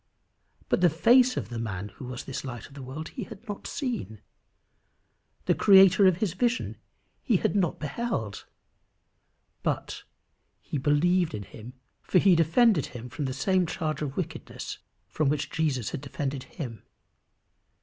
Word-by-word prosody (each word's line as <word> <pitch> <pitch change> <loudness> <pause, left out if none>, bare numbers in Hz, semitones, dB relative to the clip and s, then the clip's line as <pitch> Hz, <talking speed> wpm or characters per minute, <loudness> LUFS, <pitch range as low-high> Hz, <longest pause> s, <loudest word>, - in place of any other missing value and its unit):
But - - +1
the 175 - +6
face 245 - +5
of - - -3
the 120 -2 -5
man 105 -3 -4
who 125 - -10
was 125 -1 -6
this 135 0 -5
light 120 -5 -6
of - - -15
the 140 - -9
world 135 +5 -6
he 235 - -6
had 215 0 -12
not 205 -1 -6
seen. 245 - -4 1.3
The - - +4
creator 195 -1 +7
of 185 -3 +3
his 195 -3 -1
vision 240 +5 0 0.4
he 230 -8 +2
had - - 0
not 180 -5 +2
yet - - -23
beheld. 150 - -3 1.1
But - - -2 0.6
he 145 - -4
believed 160 +3 +2
in 105 - -5
him, 110 +5 -11 0.3
for - - +1
he 185 0 +6
defended 165 - +4
him 125 -1 -9
from 145 +3 -4
the 130 - -2
same 180 +7 +1
charge 155 -3 -3
of 145 -2 -4
wickedness 180 - -5 0.3
from 155 -3 0
which 150 0 -1
Jesus 140 -9 -1
had - - -4
defended 140 -1 -4
him. 120 - -7
155 Hz, 160 wpm, -27 LUFS, 130-190 Hz, 1.3 s, creator